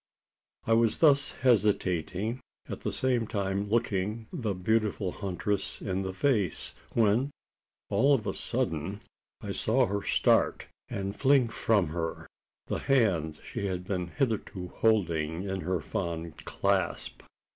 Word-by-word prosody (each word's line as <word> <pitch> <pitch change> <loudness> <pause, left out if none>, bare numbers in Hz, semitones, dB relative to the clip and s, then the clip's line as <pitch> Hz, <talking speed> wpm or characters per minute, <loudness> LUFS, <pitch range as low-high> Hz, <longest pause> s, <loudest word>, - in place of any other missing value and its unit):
I 115 - +3
was 115 -1 +3
thus 140 -3 +5
hesitating 105 -2 +1 0.3
at - - -5
the - - -3
same 125 -4 0
time 100 -1 -1
looking 110 -1 0
the 115 - -2
beautiful 105 0 0
huntress 100 +1 -2
in 95 -1 -2
the 95 -1 -3
face 100 - 0 0.2
when, 115 +4 +3 0.6
all 140 +1 +5
of 110 - -3
a - - -1
sudden, 85 +7 -2 0.4
I - - -4
saw 125 +4 +2
her 100 -2 -2
start, - - +2 0.2
and 100 +1 -3
fling 135 -2 +4
from 105 -6 +2
her 80 0 -3 0.4
the - - -2
hand 90 - +1
she 100 - -4
had 90 -2 -3
been 90 -2 -2
hitherto 105 -6 -2
holding 85 -7 +1
in 95 -1 -3
her 90 +2 -1
fond 85 +1 -4
clasp! - - -1
100 Hz, 135 wpm, -29 LUFS, 90-115 Hz, 0.6 s, thus